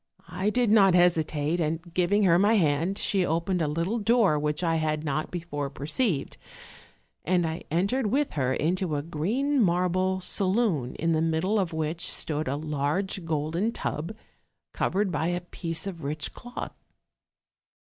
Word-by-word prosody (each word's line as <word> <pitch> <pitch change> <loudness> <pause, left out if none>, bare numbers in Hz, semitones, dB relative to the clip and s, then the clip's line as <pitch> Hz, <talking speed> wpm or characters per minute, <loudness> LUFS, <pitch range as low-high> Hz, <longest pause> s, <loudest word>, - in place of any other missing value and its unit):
I 195 +3 -1
did 240 -1 +1
not 195 -4 +6
hesitate, 165 -2 +2
and 165 +1 -3
giving 195 +4 +2
her 175 -2 +5
my 205 +3 +4
hand, 165 +1 +1
she 195 -3 +1
opened 170 +2 0
a 155 - +1
little 165 +10 -1
door 215 -7 +3
which 150 +3 -1
I 165 -1 +2
had 155 -1 -1
not 155 0 -2
before 160 -5 -4
perceived, 150 - -1 0.9
and 175 0 +1
I 160 +1 -4
en 170 +4 +1
tered 255 +1 0
with 280 +7 0
her 130 -3 0
into 170 +3 0
a 145 - -2
green 230 - 0
marble 185 0 +1
saloon, 185 - +1
in 165 +1 0
the 160 -1 +2
middle 165 +6 +1
of 185 -3 -1
which 160 +1 -3
stood 155 -1 0
a 135 - -1
large 155 +5 -2
golden 165 +7 -1
tub, 165 +8 -4 0.6
covered 195 0 0
by 160 0 -1
a 175 0 -1
piece 170 -1 -3
of 175 -5 -6
rich 150 +2 -3
cloth. 245 0 -7
170 Hz, 160 wpm, -27 LUFS, 155-195 Hz, 0.9 s, not